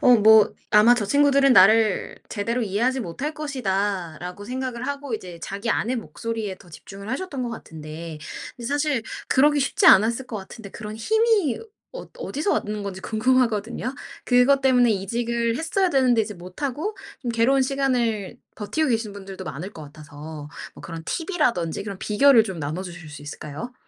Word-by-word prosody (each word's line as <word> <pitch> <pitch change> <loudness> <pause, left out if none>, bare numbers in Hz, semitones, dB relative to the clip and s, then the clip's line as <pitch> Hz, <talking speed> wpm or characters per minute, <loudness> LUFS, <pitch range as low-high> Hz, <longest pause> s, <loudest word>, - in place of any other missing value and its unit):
어 250 - +7
뭐 215 0 +6 0.2
아마 215 +3 +7
'저 220 -4 -1
친구들은 280 0 +4
나를 215 +1 +5
제대로 230 +3 -2
이해하지 235 +6 0
못할 255 - -4
것이다.'라고 195 - -3
생각을 255 +1 -4
하고 280 -4 -3
이제 180 -5 -7
자기 200 +4 -3
안의 245 +5 0
목소리에 225 -3 -5
더 180 - -17
집중을 200 +6 -11
하셨던 275 -2 -3
것 240 - -2
같은데 160 -5 -8 0.4
근데 235 -1 -7
사실 290 -3 0 0.3
그러기 290 +2 +4
쉽지 270 - +1
않았을 230 +6 +6
것 235 -4 -5
같은데 200 +1 -9
그런 215 0 -7
힘이 435 - +2 0.3
어 - - -8
어디서 315 - -1
왔는 210 0 -2
건지 195 -2 -6
궁금하거든요. 235 +2 0 0.3
그것 255 +2 +4
때문에 250 -3 +4
이직을 235 +4 -1
했어야 355 +4 0
되는데 250 -5 +3
이제 210 -1 -6
못하고 275 - -4 0.3
좀 240 - -2
괴로운 250 +4 +3
시간을 250 -7 0 0.2
버티고 300 +9 -1
계신 225 -4 -1
분들도 195 -1 -9
많을 175 +3 -6
것 160 - -10
같아서 150 0 -10 0.3
뭐 - - -13
그런 165 -1 -7
팁 330 - -3
이라든지 230 - 0
그런 200 -2 -6
비결을 235 +2 +5
좀 190 -6 -6
나눠 155 +5 -3
주실 175 -3 -9
수 150 -1 -10
있을까요? 150 - -7
225 Hz, 370 characters per minute, -24 LUFS, 195-260 Hz, 0.4 s, 어